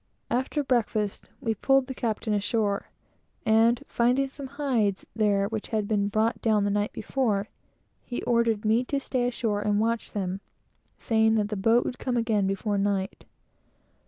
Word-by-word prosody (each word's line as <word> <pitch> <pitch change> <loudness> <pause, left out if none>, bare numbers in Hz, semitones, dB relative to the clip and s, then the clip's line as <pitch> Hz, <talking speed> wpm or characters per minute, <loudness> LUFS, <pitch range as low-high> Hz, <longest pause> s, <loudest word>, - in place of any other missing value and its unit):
After 260 +4 0
breakfast, 220 -5 -1
we 225 - 0
pulled 270 +5 +3
the 265 - -5
captain 220 -3 -2
ashore, 205 0 0 0.6
and 225 +2 +4
finding 250 +3 +2
some 275 0 -8
hides 255 -8 0
there 205 -2 +2
which 220 0 -4
had 215 -2 -1
been 200 -2 +1
brought 220 +3 0
down 215 -3 +2
the 205 - +1
night 205 +1 0
before, 220 -6 -1 0.5
he 245 - -5
ordered 230 -3 +1
me 225 +3 +3
to 280 +2 -1
stay 255 -2 -1
ashore 225 -4 -1
and 205 0 +1
watch 230 +1 -1
them, 190 -1 -3 0.6
saying 220 -1 +2
that 210 -2 +1
the 210 - -2
boat 225 +5 +3
would 250 - -4
come 250 -2 -1
again 220 -4 +1
before 200 +1 -1
night. 195 -1 -1
220 Hz, 160 wpm, -27 LUFS, 205-240 Hz, 0.6 s, and